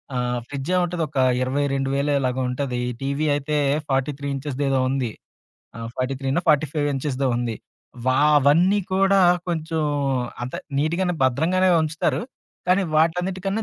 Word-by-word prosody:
ఆ! -, -, 0 dB, 0.3 s
ఫ్రిడ్జ్ 140 Hz, +2 st, -5 dB
ఏముంటది 175 Hz, -2 st, 0 dB
ఒక 145 Hz, -, -8 dB, 0.2 s
22000 140 Hz, +1 st, 0 dB
ఇలాగా 130 Hz, 0 st, -1 dB
ఉంటది. 125 Hz, -1 st, -2 dB
ఈ -, -, -3 dB
టీవీ 140 Hz, +3 st, -1 dB
అయితే 145 Hz, +1 st, -1 dB, 0.3 s
43 135 Hz, +1 st, -1 dB
ఇంచెస్ 135 Hz, -1 st, -5 dB
ఏదో 135 Hz, -1 st, +2 dB
ఉంది. 130 Hz, -4 st, -1 dB, 0.7 s
ఆహ్, 115 Hz, 0 st, -6 dB
ఫార్టీ 130 Hz, +1 st, -1 dB
త్రీనో, 135 Hz, +4 st, 0 dB
ఫార్టీ 155 Hz, 0 st, +4 dB
ఫైవో 145 Hz, -2 st, 0 dB
ఇంచెస్‌దో 135 Hz, 0 st, -1 dB
ఉంది. 120 Hz, -2 st, -2 dB, 0.5 s
వ -, -, +3 dB, 0.3 s
అవన్నీ 165 Hz, +8 st, +4 dB, 0.2 s
కూడా 195 Hz, +1 st, +4 dB, 0.3 s
కొంచెం 160 Hz, -1 st, -2 dB, 0.6 s
అంత 125 Hz, +1 st, -5 dB, 0.2 s
నిట్‌గానే 170 Hz, +5 st, 0 dB
భద్రంగానే 165 Hz, +9 st, +2 dB
ఉంచుతారు. 155 Hz, +6 st, -1 dB, 0.5 s
కానీ 185 Hz, +2 st, +4 dB
వాటన్నిటికన్నా 185 Hz, +6 st, 0 dB
145 Hz, 135 wpm, -23 LUFS, 135-170 Hz, 0.7 s, ఫార్టీ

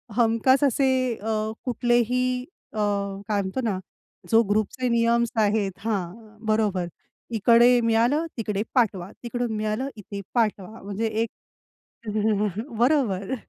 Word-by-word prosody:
हमखास 240 Hz, +4 st, +3 dB
असे 270 Hz, 0 st, +3 dB, 0.3 s
अ, 215 Hz, 0 st, -2 dB
कुठलेही 250 Hz, +1 st, +1 dB, 0.3 s
अ, -, -, -7 dB, 0.5 s
काय 205 Hz, -2 st, +1 dB
म्हणतो 190 Hz, +7 st, -3 dB
ना 200 Hz, -5 st, -1 dB, 0.5 s
जो 225 Hz, +1 st, +7 dB
ग्रुपचे 215 Hz, +5 st, 0 dB
नियम 235 Hz, 0 st, +3 dB, 0.2 s
आहेत 205 Hz, -2 st, +1 dB
हां. 215 Hz, +1 st, -4 dB
बरोबर. 210 Hz, -5 st, +1 dB, 0.4 s
इकडे 235 Hz, +2 st, +5 dB
मिळालं, 235 Hz, +8 st, +2 dB
तिकडे 210 Hz, -2 st, -1 dB
पाठवा. 200 Hz, -6 st, +1 dB
तिकडून 240 Hz, 0 st, -2 dB
मिळालं, 215 Hz, +5 st, -2 dB
इथे 200 Hz, -1 st, -7 dB
पाठवा. 215 Hz, -2 st, -1 dB
म्हणजे 205 Hz, +3 st, -2 dB
एक 220 Hz, +1 st, -1 dB, 1.5 s
बरोबर. 240 Hz, -6 st, +2 dB
225 Hz, 110 wpm, -25 LUFS, 210-240 Hz, 1.5 s, जो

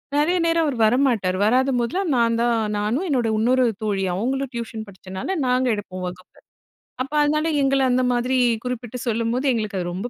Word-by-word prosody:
நெறைய 310 Hz, +5 st, +2 dB
நேரம் 330 Hz, 0 st, +2 dB
அவர் 280 Hz, -5 st, -2 dB
வரமாட்டார். 225 Hz, -6 st, +2 dB
வராத 260 Hz, +4 st, +3 dB
போதெல்லாம் 320 Hz, +10 st, -1 dB
நான் 230 Hz, -1 st, +2 dB
தான் 240 Hz, -1 st, +2 dB, 0.2 s
நானும் 230 Hz, -, -1 dB
என்னோட 245 Hz, -5 st, +1 dB
இன்னொரு 250 Hz, +3 st, +3 dB, 0.2 s
தோழி 200 Hz, -2 st, -1 dB
அவங்களும் 265 Hz, +6 st, -2 dB
டியூஷன் 225 Hz, -2 st, -5 dB
படிச்சனால 190 Hz, -, -5 dB
நாங்க 255 Hz, 0 st, +2 dB
எடுப்போம் 185 Hz, -3 st, -6 dB
வகுப்பில. 180 Hz, +1 st, -11 dB, 0.6 s
அப்போ 275 Hz, +3 st, -7 dB
அதனால 305 Hz, +2 st, +1 dB, 0.2 s
எங்கள 270 Hz, 0 st, +2 dB
அந்த 255 Hz, +1 st, +2 dB
மாரி 250 Hz, +2 st, 0 dB, 0.3 s
குறிப்பிட்டு 250 Hz, -1 st, -4 dB
சொல்லும்போது 230 Hz, +3 st, -1 dB
எங்களுக்கு 215 Hz, -3 st, -2 dB
அது 175 Hz, -1 st, -3 dB
ரொம்ப 195 Hz, +7 st, -4 dB
240 Hz, 165 wpm, -22 LUFS, 215-270 Hz, 0.6 s, வராத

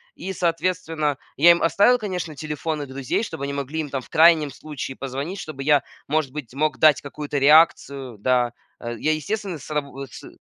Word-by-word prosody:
И, 190 Hz, -, -5 dB
соответственно, 165 Hz, -4 st, -1 dB, 0.2 s
я 170 Hz, +4 st, +8 dB
им 170 Hz, -, +2 dB
оставил, 205 Hz, +8 st, +4 dB
конечно, 180 Hz, -8 st, -4 dB
телефоны 150 Hz, 0 st, -4 dB
друзей, 135 Hz, -, -2 dB
чтобы 160 Hz, -9 st, -5 dB
они 140 Hz, -, -4 dB
могли 140 Hz, +3 st, -4 dB
им 155 Hz, -2 st, -3 dB
там 135 Hz, -1 st, -3 dB
в -, -, -17 dB
крайнем 160 Hz, -2 st, +5 dB
случае 135 Hz, -1 st, -7 dB
позвонить, 140 Hz, +8 st, -5 dB
чтобы 150 Hz, -5 st, -7 dB
я, 145 Hz, 0 st, +4 dB, 0.3 s
может 155 Hz, -2 st, 0 dB
быть, 145 Hz, -6 st, -7 dB
мог 150 Hz, +2 st, 0 dB
дать 155 Hz, -4 st, +5 dB
какую-то 145 Hz, 0 st, -5 dB
реакцию, 140 Hz, -4 st, +3 dB
да, 125 Hz, +1 st, +2 dB, 0.3 s
а, 120 Hz, -, -5 dB
я, 150 Hz, +7 st, 0 dB
естественно, 190 Hz, +4 st, -3 dB
с 145 Hz, -, -12 dB
раб 150 Hz, -1 st, -1 dB
вот, 135 Hz, -2 st, -9 dB
с -, -, -10 dB
150 Hz, 190 wpm, -23 LUFS, 135-165 Hz, 0.3 s, я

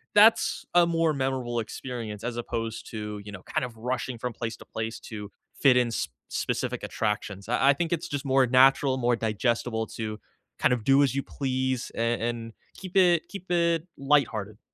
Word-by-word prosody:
that's 215 Hz, +2 st, +5 dB
a 175 Hz, 0 st, +6 dB
more 165 Hz, -1 st, +2 dB
memorable 130 Hz, -3 st, -1 dB
experience 115 Hz, -2 st, -5 dB
as 120 Hz, 0 st, -3 dB
opposed 115 Hz, -1 st, -4 dB
to, 105 Hz, -2 st, -5 dB
you 105 Hz, -, -7 dB
know, 95 Hz, -, -9 dB
kind -, -, -1 dB
of 120 Hz, -2 st, -9 dB
rushing 125 Hz, +1 st, -3 dB
from 125 Hz, +2 st, -3 dB
place 115 Hz, 0 st, -4 dB
to -, -, -14 dB
place 110 Hz, +1 st, -4 dB
to 105 Hz, -2 st, -8 dB, 0.3 s
fit 135 Hz, -3 st, +6 dB
in 120 Hz, -2 st, +2 dB
sp -, -, -2 dB, 0.2 s
specific -, -, -2 dB
attractions; 105 Hz, -2 st, -3 dB
I 125 Hz, +3 st, +4 dB
I -, -, +7 dB
think 165 Hz, +3 st, -2 dB
it's 170 Hz, -1 st, -1 dB
just 145 Hz, -1 st, -3 dB
more 135 Hz, -1 st, +4 dB
natural, 130 Hz, +1 st, +5 dB
more 120 Hz, -1 st, +2 dB
digestible 115 Hz, +1 st, -1 dB
to 110 Hz, -1 st, -4 dB, 0.4 s
kind -, -, +4 dB
of 120 Hz, -3 st, -2 dB
do 135 Hz, +4 st, +5 dB
as 135 Hz, -2 st, +1 dB
you 140 Hz, -, 0 dB
please 130 Hz, -2 st, -2 dB
and 115 Hz, 0 st, 0 dB
and 115 Hz, -1 st, -3 dB, 0.2 s
keep 185 Hz, -1 st, -9 dB
it 175 Hz, -3 st, +4 dB
keep 190 Hz, -3 st, -9 dB
it 170 Hz, -1 st, +2 dB
lighthearted. 115 Hz, -7 st, +1 dB
125 Hz, 185 wpm, -27 LUFS, 115-140 Hz, 0.4 s, I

